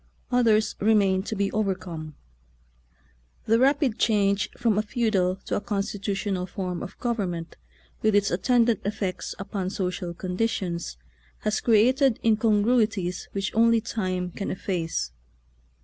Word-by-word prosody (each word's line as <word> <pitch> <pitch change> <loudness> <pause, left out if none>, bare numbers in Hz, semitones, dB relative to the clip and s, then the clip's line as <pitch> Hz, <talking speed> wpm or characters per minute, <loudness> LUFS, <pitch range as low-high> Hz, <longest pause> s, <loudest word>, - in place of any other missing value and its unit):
Others 225 -3 +3
remain 200 -3 +3
to 215 +3 -4
be 200 -1 0
overcome. 185 -7 -3 1.3
The' 225 +1 +3
rapid 270 -2 +2
change 200 -3 +2
from 220 -3 +2
a - - +4
feudal 210 -5 +1
to - - -1
a - - -1
constitutional 200 -2 -2
form 180 -2 -4
of 190 - -8
gov 240 -1 -1
ernment, 175 -5 -3 0.5
with 215 -1 +3
its 200 -1 +3
attendant 230 +3 +3
effects 200 -2 -3
upon 195 -1 -3
social 180 -2 -3
conditions, 180 - -2 0.4
has 215 0 0
created 245 +3 +4
incongrui 220 +1 +3
ties 180 -4 -4
which 195 0 -2
only 230 +1 +4
time 185 -5 -3
can 195 - -4
efface. 170 - -2
205 Hz, 130 wpm, -26 LUFS, 185-225 Hz, 1.3 s, a